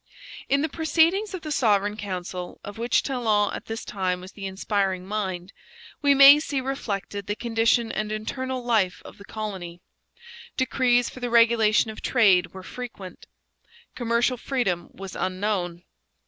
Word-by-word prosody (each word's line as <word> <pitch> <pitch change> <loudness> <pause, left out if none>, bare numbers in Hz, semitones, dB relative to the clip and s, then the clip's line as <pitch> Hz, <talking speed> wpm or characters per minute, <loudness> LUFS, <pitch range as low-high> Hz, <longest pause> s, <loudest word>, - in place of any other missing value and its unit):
In 280 +1 +2
the - - +1
proceedings 335 +6 +1
of 365 - -7
the 310 - -5
Sovereign 205 -6 +2
Council, 185 -3 -6
of 205 +2 -9
which 235 0 +2
Talon 220 -6 +1
at - - -6
this 225 0 -5
time 185 -2 -2
was 185 +1 -11
the 195 -2 -6
inspiring 190 -1 -1
mind, 190 -2 -4 0.5
we 285 -1 +4
may 280 +2 +9
see 285 -2 -2
reflected 205 -7 -4
the 205 - -1
condition 230 0 +1
and 215 0 -3
internal 255 +4 -4
life 215 -7 +1
of - - -12
the 200 - -12
colony. 190 -6 -6 0.8
Decrees 250 -2 +2
for - - -11
the 245 -1 -3
regulation 230 -2 +4
of 215 - -11
trade 185 -8 +3
were 190 0 -10
frequent. 215 -5 -9 0.7
Commercial 240 +1 0
freedom 230 -10 -2
was 195 -1 -9
unknown. 185 -2 -2
215 Hz, 150 wpm, -25 LUFS, 190-250 Hz, 0.8 s, may